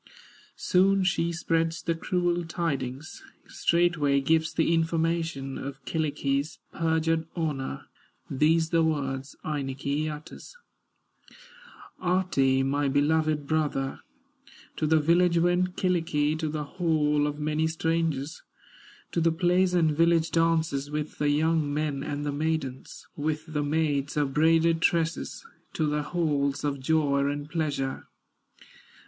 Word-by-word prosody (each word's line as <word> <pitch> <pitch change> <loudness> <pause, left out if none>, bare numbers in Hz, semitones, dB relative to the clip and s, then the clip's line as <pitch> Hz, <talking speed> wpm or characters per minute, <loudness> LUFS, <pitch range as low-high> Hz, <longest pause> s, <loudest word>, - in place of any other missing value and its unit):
Soon 195 +1 +3
she 170 -2 +1
spreads 165 -1 -1
the 165 - 0
cruel 175 +1 -1
tidings, 145 -4 -4 0.3
Straightway 170 -5 +2
gives 160 +3 +1
the 165 +1 +1
information, 165 -4 -1
Of 135 -1 -7
Kyllikki's 145 -1 -1 0.2
perjured 160 0 0
honor, 145 - -3 0.4
These 160 +4 +2
the 165 -1 +3
words 135 -3 -2
Ainikki 140 +1 -2
utters: 150 - -9 1.4
"Ahti, 175 -8 +2
my 140 +1 0
beloved 150 +1 +1
brother, 145 -3 -1 0.8
To 155 - 0
the 160 +1 +4
village 170 +3 +3
went 180 +1 +1
Kyllikki, 160 -5 +1
To 160 -1 -1
the 150 0 -3
hall 150 -3 +1
of 145 0 -4
many 155 +1 0
strangers, 160 -2 -1 0.7
To 170 - 0
the 165 0 +3
plays 180 +2 +2
and 165 -3 +3
village 165 +1 +2
dances, 160 -4 +1
With 150 0 -4
the 150 - +2
young 155 0 +1
men 145 -2 -1
and 145 +1 -4
the 145 - -1
maidens, 145 -3 -3
With 155 +1 -3
the 150 - 0
maids 145 -1 0
of 140 -2 0
braided 165 +2 +3
tresses, 165 - 0 0.3
To 155 - 0
the 150 0 0
halls 145 -3 -1
of 140 -1 -1
joy 140 -1 +1
and 145 0 -3
pleasure." 150 -4 -2
155 Hz, 125 wpm, -27 LUFS, 145-165 Hz, 1.4 s, the